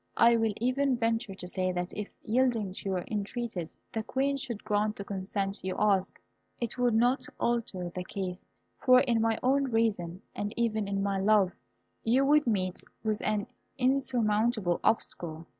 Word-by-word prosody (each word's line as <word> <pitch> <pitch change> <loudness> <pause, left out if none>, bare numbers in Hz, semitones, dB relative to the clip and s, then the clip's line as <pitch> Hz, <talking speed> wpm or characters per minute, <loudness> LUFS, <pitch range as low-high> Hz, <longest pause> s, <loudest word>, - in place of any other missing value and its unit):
I 235 0 +6
will 225 -2 +1
even 255 +2 +1
venture 225 -3 0
to 180 - -7
say, 185 0 0
that 180 0 -3
if, 210 -1 -4
yielding 230 -4 +1
to 195 - -4
your 185 -2 -1
entreaties, 210 -4 -3 0.2
the 220 - -1
Queen 270 +5 0
should 240 -5 -5
grant 210 0 +1
the 200 - -5
consent 195 0 -3
you 185 0 -3
ask, 195 -3 +2 0.4
it 235 -2 -3
would 245 -2 +3
not 245 +4 +2
alter 220 -7 -1
the 180 +1 -5
case, 185 -1 -5 0.4
for 255 0 +6
in 235 -4 +2
my 225 0 +2
own 275 +2 +3
reason, 215 -7 0
and 205 +1 -4
even 220 -3 0
in 195 0 -1
my 200 -1 0
love, 200 -2 +4 0.5
you 255 +4 +3
would 295 0 +4
meet 185 -5 0 0.2
with 215 -1 0
an 210 -1 0 0.3
insurmountable 235 -7 +2
obstacle. 165 -7 0
215 Hz, 165 wpm, -30 LUFS, 195-240 Hz, 0.5 s, I